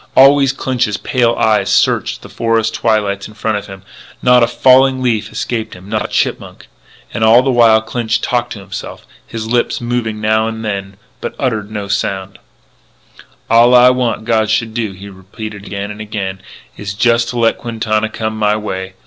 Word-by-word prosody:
Always 135 0 +6
Clinch's 125 -5 -1
little - - -9
pale 120 -2 +2
eyes 110 -1 +1
searched - - +1
the - - -9
forest 115 -1 0
twilight 105 -4 0
in 110 - -15
front 110 -1 -1
of 100 - -7
him; 95 -1 -11 0.4
not 125 0 +5
a 120 - +4
falling 130 +2 +4
leaf 110 -4 0
escaped 115 -3 -4
him; 90 +1 -13
not 105 0 -2
a - - -7
chipmunk. - - -2 0.5
And 110 - -1
all 115 +3 +6
the 135 - +1
while 115 -3 +5
Clinch 115 0 -1
talked 120 -1 -1
to 105 - -9
himself; 95 - -8 0.2
his 115 -1 -5
lips 120 +1 0
moved 120 -1 -2
a - - 0
little 105 -1 -7
now 110 +1 +2
and 110 0 -5
then, 100 -2 -4 0.2
but - - -5
uttered 110 -6 -2
no 105 -2 -5
sound: 95 -1 -3 1.1
"All 120 +2 +5
I 125 +1 +7
want 120 -4 -1
God 110 -2 +1
should 110 +1 0
do," 110 -4 -3
he 95 +2 -11
repeated 100 +2 -9
again 100 +1 -5
and 105 +1 -9
again, 100 -3 -5 0.3
"is 100 -1 -6
to - - -19
just 115 -1 +2
let 115 -1 +1
Quintana 110 -2 -1
come 110 0 -4
my 105 -1 +1
way. 95 -3 -5
110 Hz, 190 wpm, -15 LUFS, 105-120 Hz, 1.1 s, I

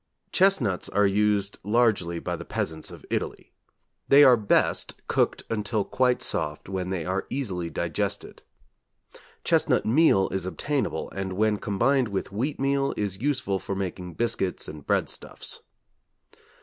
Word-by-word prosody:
Chestnuts 180 - +2
are 105 +1 +3
used 100 0 +1
largely 105 -5 +2
by - - -3
the - - -7
peasants 80 -1 -3
of - - -12
Italy. - - -3 0.5
They 140 +1 +8
are 130 -3 +8
best 105 -3 +2
cooked - - +1
until 105 -1 -1
quite 125 +3 +1
soft 75 0 -2
when 95 -1 -3
they 90 -4 -2
are 95 +2 -2
easily 95 -11 -2
digested. - - -3 1.0
Chestnut - - +2
meal 115 -5 +4
is 95 -1 -3
obtainable, 145 +8 -2
and 95 -1 -4
when 105 +2 +2
combined 125 +6 +2
with 100 -1 -3
wheatmeal 135 +3 0
is 100 -1 -3
useful 130 -9 0
for 95 +1 -4
making 90 -3 -5
biscuits 115 -5 -1
and 75 -2 -10
breadstuffs. - - -2
105 Hz, 135 wpm, -26 LUFS, 95-125 Hz, 1.0 s, They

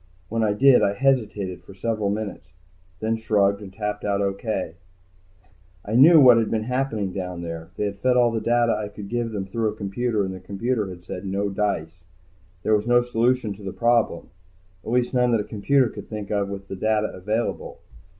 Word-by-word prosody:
When 115 +1 -1
I 105 -1 +2
did 130 +4 +5
I 100 - +2
hesitated 105 -8 0
for 100 - -14
several 110 0 -1
minutes. 100 -3 -5 0.5
Then 110 +1 0
I - - -1
shrugged 100 -2 +1
and 100 -2 -9
tapped 105 +1 -4
out, 100 -1 0
O.K. 100 -3 -2 1.1
I 105 - -4
knew 155 +7 +8
what 125 -4 +8
had 115 -2 +1
been 110 -1 -1
happening 115 -6 -2
down 90 -2 -5
there. 85 -1 -6
They 105 - -1
had 100 -1 -4
fed 125 +3 +2
all 120 -1 +4
the 115 -1 -2
data 120 0 +2
I 105 0 -3
could 100 -1 -9
give 120 -1 -1
them 100 -3 -3
through 110 +3 -1
a 105 - -6
computer, 105 +2 -1
and 95 - -4
the 95 - -8
computer 105 +4 -2
had 90 -1 -10
said 90 0 -7
no 100 +1 -1
dice. 90 -4 -2 0.6
There 110 - +3
was 105 +2 -1
no 120 0 +4
solution 120 -2 +1
to 100 - -14
the 95 -1 -6
problem, 115 -7 +1 0.5
at - - -7
least 125 +2 +1
none 125 -1 +3
that 110 - +2
a - - -4
computer 125 +6 +2
could - - -9
think 105 -2 -6
of 100 -1 0
with 100 0 -7
the 95 - -6
data 110 +2 0
available. 105 +5 -3
105 Hz, 210 wpm, -24 LUFS, 100-120 Hz, 1.1 s, knew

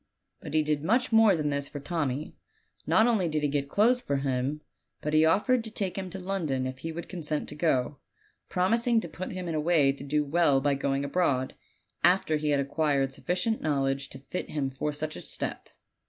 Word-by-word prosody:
But - - -7
he 155 - +4
did 150 -1 -1
much 240 +9 +2
more 225 -3 +6
than 150 -2 -1
this 140 0 -1
for 145 - -7
Tommy. 145 -1 -2 0.5
Not 220 - +5
only 220 -7 +2
did 155 -1 -1
he - - +3
get 140 -1 -1
clothes 240 - +3
for 140 - -2
him, 135 +2 -1 0.4
but 150 - -3
he 155 +1 +5
offered 225 +9 +3
to 225 - -6
take 200 -4 -2
him 190 -2 -4
to 190 +2 -6
London 170 -9 -2
if 130 0 -5
he 165 +4 -5
would 170 +1 -6
consent 155 -4 -3
to - - -6
go, 145 -4 0 0.5
promis 225 +7 +1
ing 235 -2 +4
to - - -5
put 185 - -6
him 185 -1 -5
in 165 - -2
a 155 - 0
way 150 -4 +4
to 140 0 -9
do 150 +1 0
well 145 -2 +3
by 140 +1 +1
going 140 0 -1
abroad, 140 -5 0 0.5
after 175 -4 +4
he 150 0 -1
had 145 -1 +3
acquired 140 -1 0
sufficient 185 +5 -1
knowledge 135 -2 0
to - - -10
fit 140 +7 -6
him 140 -3 -2
for 135 +3 -2
such 155 +1 -4
a - - -7
step. - - -5
150 Hz, 215 wpm, -28 LUFS, 140-180 Hz, 0.5 s, more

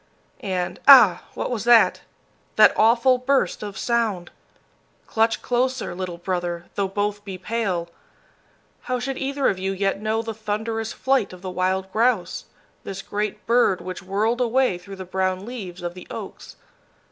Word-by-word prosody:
And 180 -2 -2
ah! 235 -11 +8
What - - -3
was 225 -4 -2
that 240 -1 +5 0.5
that - - +7
awful 240 +3 +4
burst 270 +1 +1
of 205 -2 -6
sound? 225 -7 -1 0.7
Clutch 225 0 +1
closer, 255 -2 -1
little 180 -1 -5
brother, 175 -1 -3
though 200 -1 -1
both 205 +1 -2
be 195 -2 -7
pale! 190 -4 -2 1.0
How 255 - -1
should 270 +2 -3
either 275 0 0
of 185 - 0
you 190 +1 -2
yet 195 +1 -1
know 220 +1 -1
the 225 0 -4
thunderous 220 +1 -3
flight 265 -8 0
of 180 0 -13
the 185 - -4
wild 185 +1 -1
grouse, 225 -3 0 0.4
this 195 0 -6
great 210 0 -4
bird 235 -6 +3
which 185 +1 -7
whirled 210 +6 0
away 245 -5 +1
through 195 +2 -10
the 190 -1 -8
brown 185 +1 -1
leaves 190 -7 -7
of 175 0 -3
the 180 - -12
oaks? - - -8
205 Hz, 160 wpm, -23 LUFS, 185-235 Hz, 1.0 s, ah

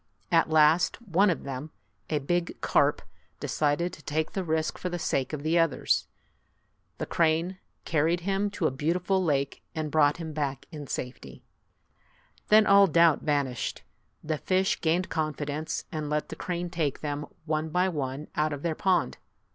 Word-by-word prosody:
At 165 -2 +4
last, 155 +2 +4
one 200 -3 +2
of 170 - -1
them, 135 +2 -5 0.4
a 155 - +1
big 175 +5 -1
carp, - - +2 0.4
decided 155 +4 0
to - - -11
take 155 +2 -2
the 190 - -2
risk 160 -2 -1
for 180 - -3
the 175 - -3
sake 135 -5 -1
of 150 -2 -5
the 165 +2 +2
others. 165 -5 +1 0.9
The - - -3
crane 170 +3 +1 0.3
carried 165 +2 +1
him 195 +3 0
to 200 -4 -3
a - - +3
beautiful 180 +7 0
lake 140 -4 0
and 155 -2 -3
brought 145 -2 +4
him 160 -2 -6
back 140 -3 -3
in 150 -3 -7
safety. 125 0 -6 1.0
Then 215 0 +6
all 200 -1 +7
doubt 165 -2 +4
vanished. 140 -5 -1 0.4
The 155 -1 -2
fish 190 0 +1
gained 175 +3 +1
confidence, 155 -1 -3
and 155 -2 -3
let 150 0 -1
the - - -6
crane 175 -1 -4
take 155 -6 -1
them 145 -1 -3 0.2
one 155 0 -1
by 180 +4 +2
one 145 -3 -3
out 155 0 +1
of 145 - -6
their 170 -2 0
pond. 185 +3 +1
160 Hz, 165 wpm, -28 LUFS, 150-175 Hz, 1.0 s, all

